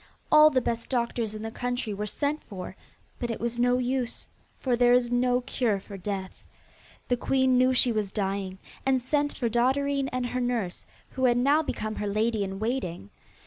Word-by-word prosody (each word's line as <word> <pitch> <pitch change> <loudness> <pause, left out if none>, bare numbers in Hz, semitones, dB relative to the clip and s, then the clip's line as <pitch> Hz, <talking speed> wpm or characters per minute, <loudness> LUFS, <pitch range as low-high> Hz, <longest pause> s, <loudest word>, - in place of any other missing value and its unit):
All 305 0 +8
the 260 -4 +1
best 230 -1 -3
doctors 235 -3 -1
in 215 - -6
the 225 - -4
country 245 -2 -3
were 210 +1 -3
sent 290 +7 -2
for, 185 -2 -7 0.4
but 240 - -2
it 230 - -3
was 235 0 -2
no 245 +1 +3
use, 250 -1 -2 0.3
for 255 -2 0
there 245 0 +5
is 245 -1 +3
no 245 0 +2
cure 240 -5 0
for 200 +1 -10
death. 190 0 -5 0.6
The 245 - +2
queen 260 +1 +2
knew 255 +1 +4
she 255 -1 +4
was 210 -3 -1
dying, 195 -2 -2 0.3
and 265 -1 +2
sent 290 +3 0
for 240 - 0
Dotterine 270 +4 +1
and 255 0 -1
her 250 +1 -2
nurse, 235 -7 -2 0.2
who 260 -1 0
had 240 -1 +4
now 280 +5 +4
become 215 -8 -4
her 210 - -2
lady 215 +1 +1
in 195 0 -4
waiting. 200 - -3
245 Hz, 190 wpm, -27 LUFS, 215-255 Hz, 0.6 s, All